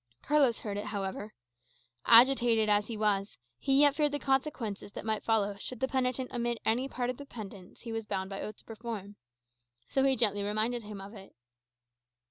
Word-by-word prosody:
Carlos 280 -6 +3
heard 205 -2 -4
it, 205 - -4
however. 205 0 -4 0.8
Agitated 235 -2 +6
as 205 0 +3
he 230 - -5
was, 205 -1 0 0.2
he 270 - +3
yet 290 -1 +6
feared 295 -1 +1
the 290 - -1
consequences 265 -7 -2
that - - -7
might 220 -1 -1
follow 210 -3 +1
should 245 +4 -7
the 265 - +1
penitent 255 -1 -1
omit 240 -1 -1
any 250 +5 +1
part 245 -1 -2
of 250 - -10
the 285 - -9
penance 200 -6 -10
he 235 - -7
was 225 -1 -4
bound 190 -2 -2
by 195 0 -6
oath 210 - -6
to - - -17
perform. 220 -3 -7 0.7
So 270 - +2
he 270 -1 +4
gently 205 -5 +3
reminded 215 +4 -1
him 210 -2 -8
of 195 +2 -10
it. 195 -3 -13
225 Hz, 190 wpm, -30 LUFS, 205-255 Hz, 0.8 s, Agitated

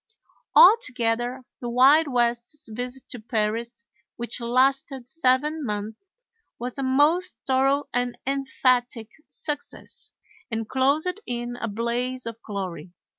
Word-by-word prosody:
Altogether 250 - +4 0.2
the 240 - -4
Wild 275 +6 +6
West's 240 +2 -1
visit 245 +3 -6
to 245 - -6
Paris, 230 +2 -2 0.3
which 235 +1 -4
lasted 260 +1 +1
seven 295 +2 +1
months, 210 -2 -4 0.6
was 250 +3 -5
a - - 0
most 295 +7 +2
thorough 270 +2 +2
and 245 0 -1
emphatic 255 -4 0 0.2
success, 295 -2 -5 0.4
and 225 -2 -3
closed 295 - +1
in 240 0 -3
a 235 - -4
blaze 240 +4 -2
of 230 0 -7
glory. 185 -6 -6
245 Hz, 115 wpm, -25 LUFS, 235-270 Hz, 0.6 s, Wild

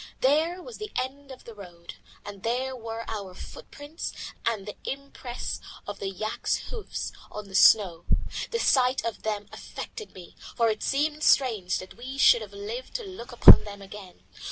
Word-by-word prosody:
There 320 +7 +2
was - - -10
the 425 0 -6
end 275 +2 -4
of 260 - -11
the 230 - -10
road, 175 -4 -11 0.3
and 200 -1 -8
there 255 +4 -1
were 230 -1 -6
our 210 -3 -4
own 180 - -14
footprints 290 - -8 0.4
and 220 -4 0
the 210 - -7
impress 270 -3 -5 0.2
of 205 -1 -6
the 195 - -2
yak's 215 +3 -1
hoofs 460 -4 -5 0.2
in 210 -1 -6
the 195 - -14
snow. 190 -4 +5 0.4
The 465 - -1
sight 260 - +3
of 230 - -3
them 210 -1 -3
affected 435 - -8
me, 180 -2 -12 0.2
for 230 -1 +4
it 215 -1 -2
seemed 300 +2 0
strange 225 -12 +3
that 185 - -9
we 260 +3 -7
should 240 -4 +6
have 210 -2 -8
lived 215 - -7
to - - -2
look 370 - -9
upon 240 - +10
them 200 -1 -9
again. 195 -2 -12
230 Hz, 180 wpm, -27 LUFS, 205-275 Hz, 0.4 s, upon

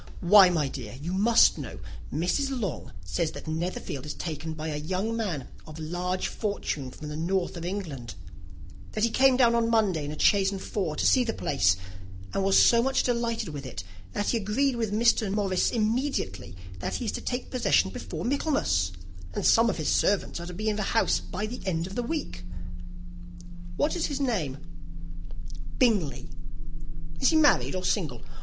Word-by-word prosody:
"Why, 190 +1 +8
my 160 -5 +1
dear, 125 -5 -7
you 170 +5 -4
must 225 +5 +5
know, - - -7 0.3
Mrs. 260 - 0
Long 195 -9 -4
says 155 - -1
that - - -9
Netherfield 160 -4 -3
is - - -5
taken 160 -1 -5
by 155 +1 -4
a 150 - -3
young 185 +9 -2
man 180 - -3 0.2
of 155 0 -10
large 175 +3 -2
fortune 200 - -3
from 150 +4 -9
the 150 - -5
north 175 +4 -1
of 170 -1 -6
England; 160 - -5 0.8
that 215 - -1
he 230 - +3
came 265 +1 +4
down 240 -2 +5
on 230 -1 +2
Monday 205 -9 +2
in 145 - -4
a 155 - -7
chaise 195 +2 +4
and 195 - -4
four 185 -5 -3
to - - -1
see 255 - +5
the 225 -2 -2
place, 95 -10 +2 0.6
and 195 - 0
was 195 0 +4
so 235 -1 +6
much 265 +2 +1
delighted 235 -4 -1
with 145 -2 -6
it 115 -8 -7 0.3
that 205 - -1
he 235 - +2
agreed 235 +6 +1
with 225 -3 -2
Mr. 220 -1 +3
Morris 195 -3 +1
immediately; 215 - -1 0.2
that - - -3
he 245 - -3
is 215 - 0
to - - -5
take 250 0 -4
possession 255 - +2
before - - -6
Michaelmas, 260 - +1 0.4
and - - -2
some 230 +1 +5
of 200 - -2
his 155 - -3
servants 200 -3 +1
are 170 - -6
to 180 - -7
be 215 +4 -3
in 210 -1 +1
the - - -1 0.2
house - - +3
by 205 +2 -5
the 235 +3 -6
end 165 -2 0
of 190 +2 -8
next 245 -1 -2
week." 190 - -4 1.3
"What 290 - +1
is 345 - 0
his 285 -2 -3
name?" 190 - -1 1.2
"Bingley." 205 - +1 0.9
"Is - - +3
he 320 - +2
married 300 -10 +4
or 185 - -3
single?" 155 - -1
195 Hz, 190 wpm, -27 LUFS, 155-230 Hz, 1.3 s, Why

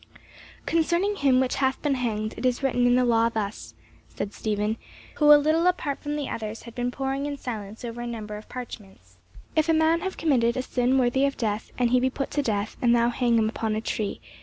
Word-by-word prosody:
"Concerning 345 +5 +1
him 265 -3 +4
which 260 -1 0
hath 265 -1 +1
been 295 -2 +2
hanged, 220 -4 -2
it - - -7
is 255 +1 +1
written 245 -2 +2
in 245 - +4
the 250 0 +3
law 230 -1 +3
thus," 215 -2 -5 0.3
said 200 - -5
Stephen, 210 0 -1 0.4
who 300 - +2
a 295 - +11
little 310 +4 +2
apart 310 -6 0
from 295 0 -3
the 290 -2 -3
others 220 0 -5
had 235 - -10
been 245 0 -1
poring 270 +2 -2
in 285 -1 -4
silence 220 -3 -6
over 235 0 -6
a 240 - -4
number 215 -3 -5
of 210 - -10
parchments. 195 - -10 0.4
"'If 315 +1 +2
a - - +5
man 320 +1 +3
have 380 -1 -4
committed 250 -6 +2
a 255 - -1
sin 255 +1 +1
worthy 265 +2 +3
of 275 - -4
death, 215 -2 -2
and 245 -1 +2
he 250 - +5
be 260 +1 +2
put 275 +1 -4
to 290 - +1
death, 210 -5 -2
and 240 -1 +4
thou 235 0 +3
hang 240 -1 +1
him 220 -1 +3
upon 220 -1 -2
a - - 0
tree. 215 -2 -3
245 Hz, 230 wpm, -26 LUFS, 225-275 Hz, 0.4 s, a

